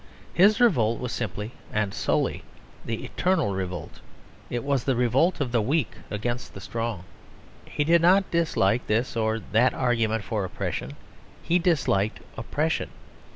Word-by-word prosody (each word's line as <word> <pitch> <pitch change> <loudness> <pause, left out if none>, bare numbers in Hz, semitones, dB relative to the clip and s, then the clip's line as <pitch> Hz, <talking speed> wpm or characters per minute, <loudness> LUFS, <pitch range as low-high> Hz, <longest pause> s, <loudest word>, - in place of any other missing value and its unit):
His 200 +5 +5
revolt 115 - +3
was 125 -1 -4
simply 105 -1 -4 0.2
and 105 -2 -1
solely - - 0 0.4
the 115 0 -4
eternal 180 - +1
revolt; 90 -3 -5 0.5
it 120 -1 -3
was 140 -3 0
the 135 - +1
revolt 125 +9 +2
of 135 -5 -1
the 120 -2 +2
weak 130 - 0 0.2
against 120 +4 -4
the - - -7
strong. 105 -1 -4 0.6
He 145 - -1
did 165 +2 +4
not 190 +3 +4
dislike 125 - +1
this 115 +4 0
or 110 -1 +1
that 120 +4 +3
argument 115 -4 +1
for 110 -2 -2
oppression; 70 -6 -4 0.5
he 175 +2 +2
disliked 135 - +1 0.2
oppression. 150 +7 -1
120 Hz, 145 wpm, -26 LUFS, 105-150 Hz, 0.6 s, His